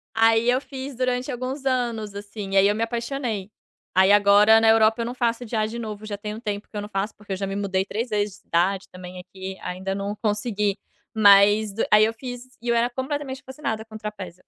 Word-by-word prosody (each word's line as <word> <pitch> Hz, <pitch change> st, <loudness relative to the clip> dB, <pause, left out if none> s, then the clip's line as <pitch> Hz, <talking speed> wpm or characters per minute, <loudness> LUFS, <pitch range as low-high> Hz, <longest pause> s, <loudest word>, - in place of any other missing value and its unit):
Aí 225 Hz, +1 st, +4 dB
eu 255 Hz, +1 st, +2 dB
fiz 270 Hz, 0 st, -7 dB
durante 255 Hz, +1 st, -1 dB
alguns 255 Hz, +3 st, -5 dB
anos, 235 Hz, -5 st, -1 dB
assim. 200 Hz, -1 st, -5 dB
Aí 195 Hz, 0 st, +6 dB
eu 205 Hz, -, +2 dB
me 220 Hz, -, -2 dB
apaixonei. 235 Hz, -3 st, -3 dB, 0.4 s
Aí, 190 Hz, +1 st, +5 dB
agora, 205 Hz, +2 st, +6 dB
na 225 Hz, -, +4 dB
Europa, 220 Hz, +1 st, +4 dB
eu -, -, -2 dB
não 240 Hz, -, -4 dB
faço 240 Hz, -1 st, -1 dB
já 215 Hz, -1 st, 0 dB
de 225 Hz, +2 st, -6 dB
novo, 215 Hz, -2 st, -6 dB
já 205 Hz, -1 st, -4 dB
tem 210 Hz, +1 st, -6 dB
um 220 Hz, -, -8 dB
tempo 205 Hz, -2 st, -4 dB
que -, -, -40 dB
eu -, -, -1 dB
não 205 Hz, -, -7 dB
faço, 200 Hz, +1 st, -3 dB
porque 205 Hz, -1 st, -9 dB
eu -, -, -1 dB
já 195 Hz, +1 st, -3 dB
me 195 Hz, -, -4 dB
mudei 190 Hz, -2 st, 0 dB
3 225 Hz, +5 st, -3 dB
vezes 205 Hz, -2 st, -1 dB
de -, -, -21 dB
cidade 185 Hz, +3 st, 0 dB
também 180 Hz, 0 st, -10 dB
aqui, 190 Hz, +1 st, -8 dB
ainda 190 Hz, +2 st, -4 dB
não 200 Hz, +1 st, -4 dB
consegui, 210 Hz, -1 st, -1 dB, 0.4 s
mas 205 Hz, 0 st, +6 dB
do 225 Hz, -, 0 dB
aí 210 Hz, 0 st, +7 dB
eu 225 Hz, -, -3 dB
fiz 250 Hz, +1 st, -9 dB
e 240 Hz, -, -5 dB
eu 235 Hz, -, +3 dB
era 235 Hz, +1 st, +2 dB
completamente 265 Hz, +1 st, -4 dB
fascinada 260 Hz, -5 st, -4 dB
com 220 Hz, -1 st, -10 dB
trapézio. 195 Hz, -5 st, -8 dB
215 Hz, 230 wpm, -24 LUFS, 200-240 Hz, 0.4 s, aí